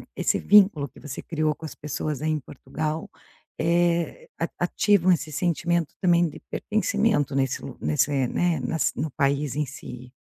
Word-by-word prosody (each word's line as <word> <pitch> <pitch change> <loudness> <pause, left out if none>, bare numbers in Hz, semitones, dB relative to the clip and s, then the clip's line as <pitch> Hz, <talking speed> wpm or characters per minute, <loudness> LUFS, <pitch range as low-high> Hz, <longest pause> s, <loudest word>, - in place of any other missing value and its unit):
esse - - +1
vínculo 195 -9 +5
que - - -17
você 145 -3 -7
criou 155 -2 -1
com 160 - -9
as - - -8
pessoas 150 -1 -4
aí 155 - 0
em 155 -1 0
Portugal, 155 +4 -5 0.5
eh, 170 - +1
a - - 0
ativam 195 -3 +3
esse 160 -3 0
sentimento 170 0 0
também 175 -2 +4
de - - -11
pertencimento 205 - 0
nesse 135 -2 0
lu - - -8
nesse, 75 - +1
eh, 135 -3 +1
né 170 0 +1
nas 155 +5 0
no 155 - -2
país 140 -1 0
em 150 0 0
si. 125 -1 -10
155 Hz, 170 wpm, -25 LUFS, 140-175 Hz, 0.5 s, vínculo